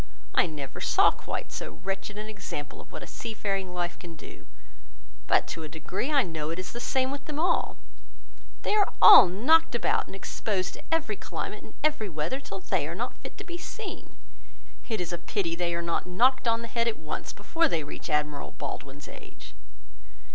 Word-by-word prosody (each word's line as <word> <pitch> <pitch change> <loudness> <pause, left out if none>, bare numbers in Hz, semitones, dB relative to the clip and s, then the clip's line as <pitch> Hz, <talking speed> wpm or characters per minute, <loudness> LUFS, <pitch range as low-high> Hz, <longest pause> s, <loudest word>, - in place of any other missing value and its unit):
I - - +4
never 145 -4 -6
saw - - +5
quite - - -5
so 75 - -5
wretched 195 +1 -3
an 210 - -4
example 190 -8 -6
of - - -17
what - - -7
a - - -6
sea 225 -2 -6
faring 195 -3 -1
life 175 -1 -3
can 170 -2 -9
do; 155 - -12 0.8
but - - +4
to 165 - -4
a 155 - -6
degree, 165 - -3
I 280 -3 +5
know 160 -3 -3
it 165 - -3
is 185 - -5
the 240 - -5
same 260 +1 +1
with 280 0 -5
them 300 -1 -4
all: 340 +1 +1 0.9
they - - +1
are 415 -2 +4
all - - +11
knocked 245 - +4
about, 240 - +1
and - - -9
exposed 195 -1 -2
to - - -9
every 325 -1 +1
climate, - - -5
and - - -14
every 295 -9 +1
weather, 160 - -2
till 195 -8 -7
they 175 -7 0
are 170 - -4
not 240 +6 -4
fit - - -9
to - - -7
be 345 0 -7
seen. 425 +2 -7 0.7
It 220 -3 0
is 175 -1 -3
a 175 - -2
pity 170 -1 -1
they 170 0 0
are 170 - -2
not 170 +1 -1
knocked 245 +8 +3
on 230 0 +2
the - - -5
head 230 +1 0
at 230 - 0
once, 155 -1 -5
before 325 +11 +1
they 165 - 0
reach 145 - -7
Admiral 150 -1 -1
Baldwin's 140 0 -6
age." - - -12
195 Hz, 205 wpm, -28 LUFS, 165-240 Hz, 0.9 s, all